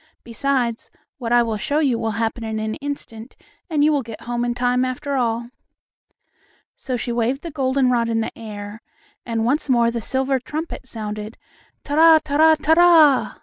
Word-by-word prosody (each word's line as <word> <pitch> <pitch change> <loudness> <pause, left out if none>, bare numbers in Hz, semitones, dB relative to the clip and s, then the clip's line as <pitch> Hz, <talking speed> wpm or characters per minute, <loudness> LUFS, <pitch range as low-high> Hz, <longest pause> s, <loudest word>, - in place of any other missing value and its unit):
Besides, 240 -1 -2 0.3
what 235 -2 -4
I 240 0 +5
will 225 -2 -2
show 285 +7 -2
you 270 -7 +1
will 225 -1 -1
happen 230 +1 -2
in 220 -1 -3
an 215 0 -3
instant, 265 -5 -7 0.3
and 300 -3 +1
you 305 - +4
will 285 - +1
get 225 -3 -10
home 240 0 -2
in 240 0 -1
time 250 +1 +1
after 255 +2 -3
all." 235 -1 -1 1.2
So 255 -2 -4
she 240 - -4
waved 240 +4 -1
the 335 - -6
goldenrod 260 -4 +1
in 225 0 0
the - - -5
air, 210 -1 -8 0.5
and 225 -1 -1
once 285 +4 0
more 235 -2 +3
the 235 -1 -4
silver 265 +3 0
trumpet 300 +1 -6
sounded: 215 -1 -6 0.5
"Ta 290 - -6
ra 320 +1 +7
ta 295 -2 -4
ra 315 +1 +6
ta 315 +1 +2
ra!" 325 -5 +5
245 Hz, 185 wpm, -21 LUFS, 230-285 Hz, 1.2 s, ra